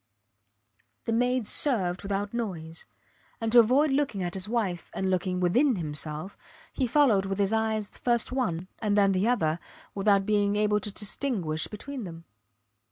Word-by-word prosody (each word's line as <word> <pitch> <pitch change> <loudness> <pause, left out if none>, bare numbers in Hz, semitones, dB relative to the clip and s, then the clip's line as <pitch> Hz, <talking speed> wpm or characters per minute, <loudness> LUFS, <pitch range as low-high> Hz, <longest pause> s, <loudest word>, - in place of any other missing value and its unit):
The 230 - -1
maids 245 -1 +1
served 190 -12 0
without 200 +1 -3
noise; 170 -9 -5 0.5
and 225 -2 -2
to 240 - +8
avoid 265 +6 +4
looking 270 -9 0
at 175 -1 -3
his 190 +1 0
wife 200 -7 -2
and 190 0 0
looking 180 0 0
within 240 +10 +3
himself, 155 +1 -4 0.4
he 260 - 0
followed 225 -8 +3
with 195 0 -2
his 200 +1 +1
eyes 220 -2 0
first 240 -1 0
one 185 -10 -1
and 210 -2 0
then 200 -1 +5
the 190 +3 +1
other 165 -10 +1 0.3
without 200 -1 +2
being 205 -1 +2
able 210 0 +2
to 210 +1 -3
distinguish 195 - -2
between 250 +3 -7
them. 165 -1 -9
205 Hz, 160 wpm, -27 LUFS, 185-235 Hz, 0.5 s, to